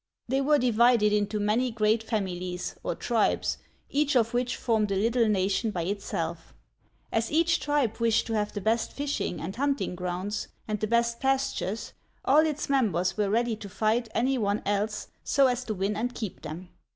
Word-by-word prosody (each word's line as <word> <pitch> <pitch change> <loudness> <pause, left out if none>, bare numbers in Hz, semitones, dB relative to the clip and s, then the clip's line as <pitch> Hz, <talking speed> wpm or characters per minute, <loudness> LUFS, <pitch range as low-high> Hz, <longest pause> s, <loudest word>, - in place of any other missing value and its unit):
' - - -58
They 270 +2 +2
were 295 +2 +4
divided 235 -3 +4
into 210 0 0
many 215 +5 +1
great 220 0 +1
fami 200 -6 -2
lies, 180 - -5
or - - -2
tribes, 230 +2 0 0.3
each 290 0 +1
of 235 -1 +3
which 245 0 0
formed 220 -4 0
a - - +1
little 230 +3 +2
nation 200 +2 +1
by 180 -5 -2
it 200 +3 -2
self. - - -4 0.6
As 225 0 0
each 335 +2 +3
tribe 285 -7 0
wished 230 -1 +2
to 225 - -3
have 210 -1 0
the 205 - -5
best 225 +3 0
fishing 285 -10 -2
and 190 +4 -5
hunting 280 -4 0
grounds, 180 +3 -3 0.2
and 210 -1 -2
the 215 - -1
best 235 +1 +1
pastures, 265 -6 -1 0.3
all 305 +4 +5
its 300 -1 -3
members 190 - +1
were 210 -2 0
ready 230 +2 +1
to 205 -2 -9
fight 220 +4 0
any 255 +4 +2
one 205 -1 0
else 205 +1 -1 0.2
so 280 -1 +3
as 250 -1 +1
to 215 - -3
win 195 +2 -1
and 245 +4 -2
keep 215 -6 -5
them. 175 +4 -7
225 Hz, 190 wpm, -27 LUFS, 205-245 Hz, 0.6 s, all